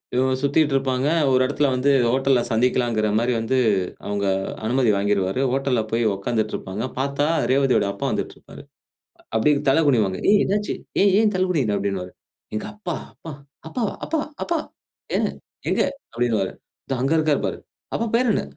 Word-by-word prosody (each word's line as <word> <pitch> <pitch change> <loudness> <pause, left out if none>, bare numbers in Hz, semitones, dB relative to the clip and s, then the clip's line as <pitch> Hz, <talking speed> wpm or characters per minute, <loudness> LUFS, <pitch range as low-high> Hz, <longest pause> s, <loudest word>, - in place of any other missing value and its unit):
இவங்க 130 +1 +2
சுத்திட்டு 145 0 +2
இருப்பாங்க. 130 0 0 0.2
ஒரு 130 0 +4
இடத்தில 145 +1 +1
வந்து 135 +3 +2 0.2
ஹோட்டல்ல 135 -2 +3
சந்திக்கலாங்கிற 115 -2 +1
மாரி 120 +2 +1
வந்து 130 +4 0 0.5
அவங்க 100 0 -2 0.4
அனுமதி 120 -1 +2
வாங்கிருவாரு. 100 +3 0
ஹோட்டல்ல 135 -3 +1
போய் 115 +1 +1
உட்கார்ந்துட்டு 110 +2 -2
இருப்பாங்க. 100 +5 -5 0.2
பார்த்தா 140 +1 0 0.3
ரேவதியோட 135 -6 +3
அப்பா 100 - -5
வந்துட்ருப்பாரு. - - -6 0.7
அப்படியே 140 +7 +3
தலை 160 +5 +4
குனிவாங்க. 105 -8 +2
ஏய் 205 -1 +5
என்னாச்சு 205 +1 -1 0.3
ஏன் 200 - +5
ஏன் 215 -2 +2
தலை 185 0 +2
குனிற 130 - +1
அப்படின்னுவாரு. 95 -2 -3 0.4
எங்கப்பா, 185 - -4 0.2
அப்பா, 160 - -10 0.4
அப்பாவா, 225 -2 -2
அப்பா, 320 0 -1 0.2
அப்பா 340 -1 0 0.6
ஏன் - - +1 0.4
எங்க - - +2 0.3
அப்படின்னுவாரு. 115 -5 0 0.4
தோ 135 - 0
அங்க 135 +4 +2
இருக்கார் 155 -2 +1
பாரு. - - -4 0.4
அப்பா 230 - 0
பேர் 245 -2 +3
என்ன? - - 0
130 Hz, 150 wpm, -23 LUFS, 110-150 Hz, 0.7 s, ஏய்